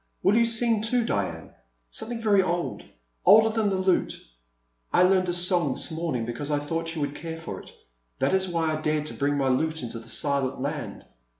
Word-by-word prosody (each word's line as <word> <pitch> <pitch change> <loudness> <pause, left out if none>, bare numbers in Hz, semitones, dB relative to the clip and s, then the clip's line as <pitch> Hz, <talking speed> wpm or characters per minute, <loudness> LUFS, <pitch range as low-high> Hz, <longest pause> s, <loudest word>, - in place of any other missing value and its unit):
Will 200 - +4
you 235 0 +5
sing 230 -1 +2
too, 230 +1 +1
Diane? 90 - -3 0.4
Something 235 - -4
very 205 -3 +4
old, 175 -1 -2 0.4
older 220 +4 +7
than 220 -2 0
the 195 - 0
lute.'* 185 -1 +1 0.4
*' - - -46
I - - +5
learned 185 0 +3
a - - 0
song 175 -5 +2
this - - 0
morning 160 -8 -2
because 120 +5 -5
I 145 - +1
thought 165 +3 -3
you 155 - -3
would 145 0 -2
care 165 +2 -6
for 165 - -6
it. - - -14 0.5
That - - +1
is 190 -1 +2
why 165 -2 0
I 155 - -5
dared 155 -1 0
to - - -5
bring 145 0 0
my 135 -1 +1
lute 155 +3 0
into 115 -1 -5
the 115 0 -13
Silent 135 +3 -1
Land. 140 -6 -5
160 Hz, 210 wpm, -26 LUFS, 140-190 Hz, 0.5 s, older